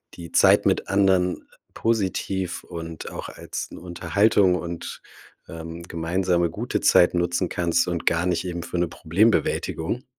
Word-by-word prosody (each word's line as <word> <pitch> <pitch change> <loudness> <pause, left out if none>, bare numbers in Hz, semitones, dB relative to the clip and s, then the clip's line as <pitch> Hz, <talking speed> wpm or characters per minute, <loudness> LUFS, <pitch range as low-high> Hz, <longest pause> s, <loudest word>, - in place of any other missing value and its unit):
die 85 -2 -10
Zeit - - +5
mit - - +1
anderen 95 -2 +2 0.3
positiv 95 -4 -1
und 80 -1 -7
auch - - -6
als - - -6
'n - - -9
Unterhaltung 95 +2 +2
und, 85 -1 -6 0.4
ähm, 85 +1 -8
gemeinsame 85 +1 0
gute - - -3
Zeit 90 - +5
nutzen 85 +1 0
kannst 85 0 +1
und 85 -2 -3
gar 85 +1 +2
nicht 90 -1 0
eben 85 -1 -4
für 90 - -5
'ne 90 - +1
Problembewältigung. 100 - 0
90 Hz, 140 wpm, -24 LUFS, 85-95 Hz, 0.4 s, Zeit